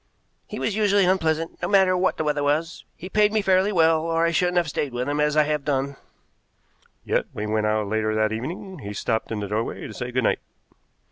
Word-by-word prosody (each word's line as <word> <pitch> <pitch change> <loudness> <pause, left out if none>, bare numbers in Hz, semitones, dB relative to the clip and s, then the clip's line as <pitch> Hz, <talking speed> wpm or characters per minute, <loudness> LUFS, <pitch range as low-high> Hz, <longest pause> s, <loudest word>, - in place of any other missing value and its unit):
"He - - -7
was 210 - -1
usually 205 -2 +3
unpleasant, 165 -3 0
no - - -1
matter 190 -2 +4
what 185 +1 +1
the - - -1
weather 150 -1 0
was. 150 +4 -1
He 185 - -9
paid 210 +2 +3
me 215 -1 +1
fairly 190 +1 +3
well, 165 -3 +3
or 165 0 +1
I 170 - +2
shouldn't 180 +1 +1
have 175 -2 +2
stayed 145 -2 -3
with 125 +2 -2
him 145 +1 -1
as 150 0 +1
I 155 - +6
have 150 -1 -1
done." 140 -1 -1 1.1
"Yet, - - 0
when 105 - -4
he - - -2
went 110 -1 +1
out 105 0 +1
later 110 +1 -1
that 110 0 +1
evening, 170 - -6
he 105 -5 -7
stopped 110 +2 -2
in 105 -2 -3
the 100 - -3
doorway 110 +3 -3
to - - -8
say 125 -1 -5
good 130 0 0
night." - - +2
150 Hz, 230 wpm, -24 LUFS, 120-180 Hz, 1.1 s, I